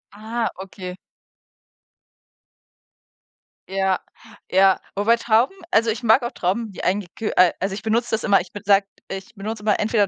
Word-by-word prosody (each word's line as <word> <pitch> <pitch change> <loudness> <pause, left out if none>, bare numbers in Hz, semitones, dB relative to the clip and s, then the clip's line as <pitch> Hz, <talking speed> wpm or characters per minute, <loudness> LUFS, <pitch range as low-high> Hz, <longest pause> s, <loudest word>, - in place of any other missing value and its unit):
Ah, 225 +2 -2
okay. 185 -1 -7 2.7
Ja, 190 -1 +1 0.5
ja. 190 0 +5 0.2
Wobei 210 +4 +4
Trauben 235 - +2 0.2
also, 225 +1 +3
ich 225 +3 -2
mag 230 +3 +5
auch 240 - -2
Trauben, 205 +5 -2
die 190 - -9
eingeküh 200 +3 -1
äh, 180 -1 +6
also, 195 +1 -2
ich 195 - -5
benutze 225 +2 0
das 220 - 0
immer. 200 -3 +4
Ich 175 - -12
bin 205 - -8
sag 200 0 +5 0.3
ich 195 +5 -7
benutze 210 +2 -5
immer 210 -1 +2
entweder 210 -1 +2
210 Hz, 155 wpm, -22 LUFS, 195-225 Hz, 2.7 s, äh